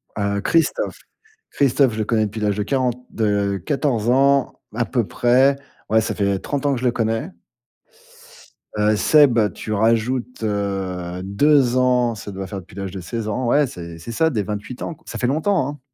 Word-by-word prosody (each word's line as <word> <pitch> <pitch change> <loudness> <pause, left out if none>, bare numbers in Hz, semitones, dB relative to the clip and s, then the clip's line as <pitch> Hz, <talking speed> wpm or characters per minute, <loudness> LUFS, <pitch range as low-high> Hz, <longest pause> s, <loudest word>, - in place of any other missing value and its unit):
Heu, 100 -1 -1
Christophe. 170 - 0 0.5
Christophe, 135 -3 +2
je 110 - -5
le 105 - 0
connais 110 -1 +1
depuis 105 +1 -6
l'âge 105 -1 0
de 105 - 0
40 125 +1 0 0.2
de 100 -2 0
14 130 -6 0
ans 135 +1 +3 0.2
à 120 0 0
peu 120 -5 0
près. 130 +2 +3 0.3
Ouais, 110 0 +4
ça - - -2
fait 100 -2 0
30 145 +6 -3
ans 140 - +3
que 125 - -2
je - - -2
le 125 - +3
connais. 115 -1 -1 1.5
Heu, 105 0 +2
Seb, 140 -2 +5
tu 110 - -7
rajoutes 115 +3 0
heu, 95 -4 -3
2 130 +5 +3
ans, 125 -2 +2
ça 100 0 -8
doit 95 0 -6
faire 100 +1 -6
depuis 90 0 -15
l'âge 95 -2 -5
de 95 - -6
16 115 +4 -5
ans. 125 +5 -2
Ouais, 145 +4 +4
c'est 85 -7 -8
c'est 85 +8 -8
ça, 160 +8 +2
des 110 -7 -1
28 105 +5 -6
ans, 165 - -4
ça - - -6
fait 125 - 0
longtemps, 155 +2 +1
hein. 145 -1 -7
115 Hz, 190 wpm, -21 LUFS, 100-130 Hz, 1.5 s, Seb